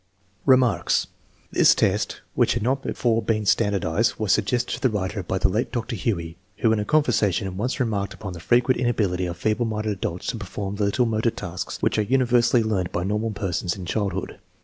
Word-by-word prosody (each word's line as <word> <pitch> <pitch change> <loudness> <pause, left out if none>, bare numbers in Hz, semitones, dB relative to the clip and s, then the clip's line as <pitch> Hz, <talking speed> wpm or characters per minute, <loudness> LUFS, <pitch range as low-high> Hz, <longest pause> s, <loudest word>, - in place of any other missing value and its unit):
Remarks. 130 -3 +3 0.5
This - - +5
test, - - 0
which - - +2
had 120 - -2
not 135 +3 +1
before 115 -3 0
been 110 -2 -1
stand 105 0 +2
ardized, 95 +4 +1
was 110 -3 0
suggested 120 +4 +1
to - - -5
the 130 - +3
writer 100 -1 -2
by 95 +1 -2
the 95 - +3
late 105 +5 -1
Dr. 120 0 -3
Huey, 85 -6 -2 0.2
who 115 - +2
in 110 - +2
a 105 - -2
conversation 105 - +1
once 125 - -2
remarked 105 -5 -1
upon 95 -4 -7
the 85 - -8
frequent 120 +7 +2
inability 100 -7 0
of 85 -1 -5
feeble 110 +5 0
minded 110 -1 -2
adults 90 -3 -4
to 120 - -3
perform 100 0 -5
the 105 - +1
little 110 +5 +2
motor 115 0 +1
tasks 95 -6 -5
which - - +2
are - - +4
universally 120 0 +3
learned 95 -5 -1
by 85 - -2
normal 105 +4 -1
persons 95 -4 -2
in 95 - -7
childhood. 95 0 -3
105 Hz, 200 wpm, -24 LUFS, 95-120 Hz, 0.5 s, This